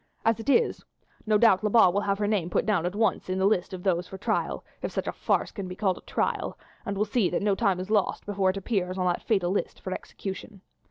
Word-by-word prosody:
As 225 0 +3
it 225 - -4
is, 460 - +2 0.4
no 215 -1 +4
doubt 210 -3 +5
Lebat 210 -4 +5
will 200 - +1
have 200 -1 0
her 210 - 0
name 205 -5 0
put - - +1
down 200 -6 +1
at 180 - -4
once 215 -3 0
in 185 - 0
the 190 - +2
list 195 -2 +2
of 185 -1 -7
those 180 -2 +1
for 190 - -8
trial, 195 - -1 0.2
if - - -3
such - - -2
a - - -1
farce - - 0
can 195 -3 -6
be 180 - -6
called 190 -2 0
a - - -17
trial, - - -2 0.3
and 200 0 -2
will 210 - +2
see 210 -2 +1
that - - -1
no 205 -1 +3
time 195 -3 +1
is 185 +3 -5
lost 210 -3 +1
before 195 -2 +1
it 190 - -1
appears 190 -3 -1
on 185 - 0
that 175 -1 +1
fatal 190 -5 +1
list 200 - -2
for 185 - -4
execution. 195 +1 -7
195 Hz, 260 wpm, -27 LUFS, 185-210 Hz, 0.4 s, doubt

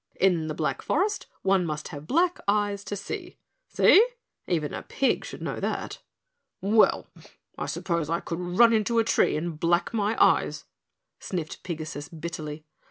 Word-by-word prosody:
"In 175 -5 +3
the 155 - -3
Black 155 -1 -1
Forest 405 +6 0 0.2
one 190 -1 +3
must 150 -2 -4
have 150 -2 -9
black 345 +4 +2
eyes 205 -1 +1
to 205 - -4
see. 195 - -6 0.3
See? 420 - +6 0.4
Even 160 -5 -1
a - - -4
pig 270 - 0
should - - -8
know - - -3
that." - - -3 0.6
"Well, 215 +3 +3 0.5
I - - -4
suppose 170 -4 -2
I 170 +1 +1
could 170 0 -5
run 180 +7 +4
into 225 +1 +1
a 230 - +5
tree 225 - +2
and 160 -1 -4
black 175 +5 +1
my 215 0 0
eyes," - - +3 0.5
sniffed 170 -5 -5
Pigasus 155 -4 -6
bitterly. 155 -2 -6
175 Hz, 160 wpm, -26 LUFS, 155-210 Hz, 0.6 s, See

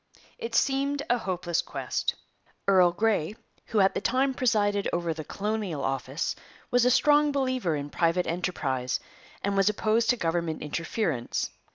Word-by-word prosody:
It 465 -1 -4
seemed 280 +1 +1
a 245 - +3
hopeless 175 -4 -1
quest. - - -2 0.5
Earl 185 -3 +6
Grey, 210 -1 0 0.3
who 215 -3 +2
at 190 - +4
the - - -2
time 265 +2 +1
presided 205 -5 +1
over 170 -1 -1
the 155 0 -6
Colonial 205 -3 -3
Office, 135 +3 -2 0.4
was 245 0 +4
a - - +5
strong 295 +3 +4
believer 255 - 0
in 145 0 -5
private 170 +1 +1
enterprise, 140 -7 -1 0.4
and 200 0 0
was 195 +1 +4
opposed 220 +2 +1
to 245 - +4
government 165 -3 -1
interference. 160 - -2
195 Hz, 150 wpm, -27 LUFS, 165-240 Hz, 0.5 s, Earl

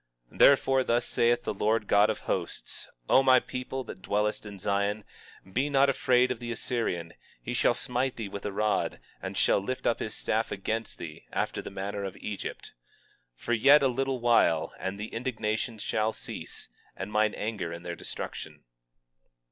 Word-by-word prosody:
20:24 - - -14
Therefore, 135 -1 +6
thus 120 -1 +1
saith 120 +1 +2
the 110 - -2
Lord 110 +2 +1
God 100 +1 +5
of 110 - -2
Hosts: 90 -3 -3 0.2
O - - +6
my 130 -1 +6
people 130 +1 -5
that 105 - -9
dwellest 105 +2 -1
in 100 -1 -8
Zion, 100 +2 0 0.5
be 135 +4 +1
not 140 0 +4
afraid 125 -1 +3
of 125 - -3
the 120 -1 -5
Assyrian; 110 -9 -2 0.3
he 120 - -5
shall 120 0 +3
smite 125 0 -1
thee 115 -3 -4
with 100 0 -7
a 105 - -2
rod, 105 +2 0 0.2
and - - -5
shall - - +4
lift 130 +6 -4
up 115 - +2
his 110 - -4
staff 110 +1 -1
against 110 +3 -3
thee, 75 -2 -9
after - - -1
the - - -7
manner 100 +1 -4
of 95 -2 -5
Egypt. 105 -2 -6 0.6
20:25 - - -27
For 120 - 0
yet 140 +6 +6
a - - +5
very 130 - +2
little 135 -1 0
while, 115 -9 +3
and 95 +1 -4
the 105 - -6
indignation 115 -2 -2
shall 110 +1 0
cease, - - -8 0.3
and 95 +3 -6
mine 105 0 +2
anger 105 -6 -3
in 85 0 -7
their 85 -1 -4
destruction. - - -7
110 Hz, 185 wpm, -29 LUFS, 100-125 Hz, 0.6 s, Therefore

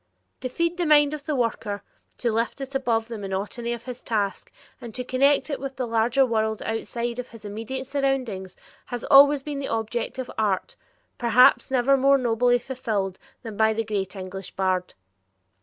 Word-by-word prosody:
To 255 - -4
feed 335 +6 -1
the 350 -2 0
mind 295 -1 +5
of 300 -1 -7
the 300 - 0
worker, 225 -4 -2 0.3
to 235 - 0
lift 230 +4 -1
it 270 0 -6
above 235 -4 0
the 230 -2 -6
monotony 205 +5 -3
of 235 -1 -4
his 250 -1 -7
task, 205 -3 -2 0.3
and 235 -3 -9
to 250 - -2
connect 275 +4 +2
it 280 - -2
with 270 0 -5
the 255 - -2
larger 235 +4 +3
world, 220 -2 -1
outside 235 +2 -3
of 250 - -4
his 225 -2 -12
immediate 225 +6 -5
surroundings, 260 -9 -2 0.3
has 245 -1 -5
always 280 0 +7
been 290 -1 -4
the 275 - -3
object 225 +3 -2
of 260 -1 -5
art, 200 -4 0 0.4
perhaps 240 +1 +5
never 265 +1 +3
more 275 +1 +5
nobly 245 0 +2
fulfilled 225 -7 -3 0.2
than 225 -3 -7
by 220 +1 +3
the 225 +1 -1
great 205 -3 -3
English 190 0 -7
bard. 185 -1 -1
240 Hz, 180 wpm, -25 LUFS, 220-265 Hz, 0.4 s, always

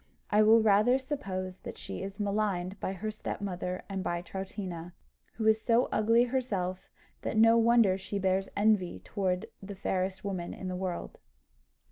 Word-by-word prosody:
I 210 - +5
will 220 +1 +7
rather 215 +4 +5
suppose 190 -10 -4
that - - -8
she - - -6
is 195 +2 -6
maligned 200 -2 -1
by 190 - -2
her 215 +3 -4
stepmother 185 -3 -4
and 195 -2 -3
by 175 -1 -2
Troutina, 185 -3 -6 0.4
who 220 - -3
is 220 0 +4
so 235 +2 +3
ugly 230 +3 +4
herself 210 -8 -2 0.3
that - - -2
no 225 +1 +7
wonder 225 -5 +4
she 195 +1 -4
bears 190 0 +1
envy 205 - +2
towards 185 0 -1 0.2
the 200 +1 -7
fairest 190 +1 -2
woman 185 -4 -3
in 185 - -5
the 185 - -3
world." 180 -1 -4
195 Hz, 160 wpm, -30 LUFS, 185-220 Hz, 0.4 s, will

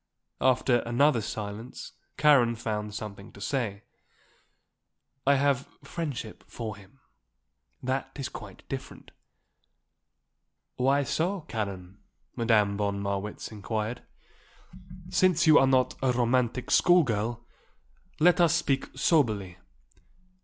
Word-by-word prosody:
After 130 -1 +3
another 120 +2 +2
silence 105 +3 -6 0.3
Karen 130 -6 +5
found 105 -2 -4
something 105 -2 -7
to - - -13
say. 105 -3 -2 1.4
"I 140 - +6
have 140 -1 +1 0.2
friendship 140 -7 -5
for 110 -3 -6
him. 100 +6 -18 0.8
That 130 +1 -1
is 135 -2 -4
quite - - -11
different." - - -7 1.6
"Why 135 +3 +2
so, 170 +8 -1
Karen?" 100 - -5 0.4
Madame 105 -3 +2
von 100 -1 -1
Marwitz 100 +2 -4
inquired. 110 +2 -3 1.1
"Since 180 -2 +3
you 155 -1 +7
are 135 - +4
not 130 -1 +3
a 130 -1 +2
romantic 125 0 0
school 175 -1 +6
girl, 120 0 -2 0.7
let 175 +3 +5
us 170 -1 +4
speak 140 -5 0
soberly. 110 - +1
120 Hz, 105 wpm, -28 LUFS, 105-140 Hz, 1.6 s, you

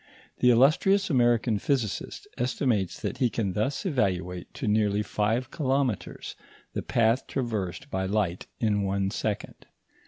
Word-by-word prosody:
The 125 - +5
illustrious 165 - +4
American 120 -4 +3
physicist 120 -3 -2
estimates 120 -6 0
that 130 - -3
he 125 -3 +3
can 105 -5 -2
thus 135 - -1
evaluate 90 - -1
to 130 - -4
nearly 105 -1 +2
five 115 +6 -1
kilometres 135 - -1 0.4
the - - -2
path 115 +3 +1
traversed 110 -9 -3
by 95 0 -1
light 95 -3 -1
in 105 -3 +1
one 100 0 0
second. 105 -1 -4
110 Hz, 130 wpm, -27 LUFS, 100-130 Hz, 0.4 s, The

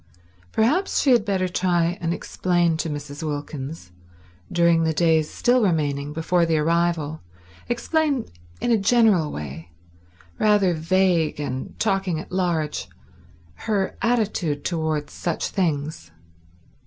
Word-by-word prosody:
Perhaps 300 - +2
she 275 - +4
had 240 -4 +5
better 190 -3 0
try 175 -1 +1
and 165 -1 -1
explain 175 -1 0
to 160 - -2
Mrs. 145 0 -6
Wilkins, 145 - -5 0.6
during 170 -1 +3
the 160 -1 0
days 160 -2 +3
still 250 +1 +2
remaining 145 -7 0
before 165 +3 +1
the 165 -1 +2
arrival—explain 165 - -1 0.3
in 240 - 0
a 225 - +4
general 205 -7 +3
way, 75 +3 -7 0.7
rather 205 -4 +4
vague 170 -1 +1
and 130 -3 -5
talking 195 -5 0
at - - -9
large—her 175 - -3
attitude 210 -11 0
towards 160 -4 -2
such 170 -2 -2
things. 155 - -2
170 Hz, 115 wpm, -23 LUFS, 150-195 Hz, 0.7 s, had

